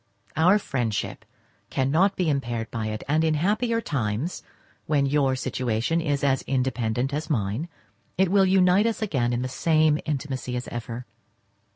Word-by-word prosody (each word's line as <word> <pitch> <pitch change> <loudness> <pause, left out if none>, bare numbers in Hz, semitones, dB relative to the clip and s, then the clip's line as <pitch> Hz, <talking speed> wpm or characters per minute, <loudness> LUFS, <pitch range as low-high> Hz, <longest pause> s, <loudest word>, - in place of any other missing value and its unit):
Our 180 +6 +5
friendship 120 - -3 0.4
cannot 160 +10 +2
be 180 - 0
impaired 120 -6 -1
by 110 -2 -3
it, 110 0 -4
and 155 +3 +2
in 160 -1 +2
happier 215 +8 +1
times, 125 - -2 0.5
when 145 -2 +2
your 135 -1 +2
situation 125 +5 -1
is 145 -3 -1
as 135 -1 +2
independent 125 -1 0
as 150 +2 -3
mine, 115 - -1 0.5
it 190 -1 +3
will 195 -1 +5
unite 185 +2 +4
us 225 -1 -1
again 130 - 0
in 120 +1 -1
the - - -1
same 155 +2 +2
intimacy 130 -4 -3
as 125 - -5
ever. 120 +1 -6
140 Hz, 155 wpm, -25 LUFS, 120-165 Hz, 0.5 s, Our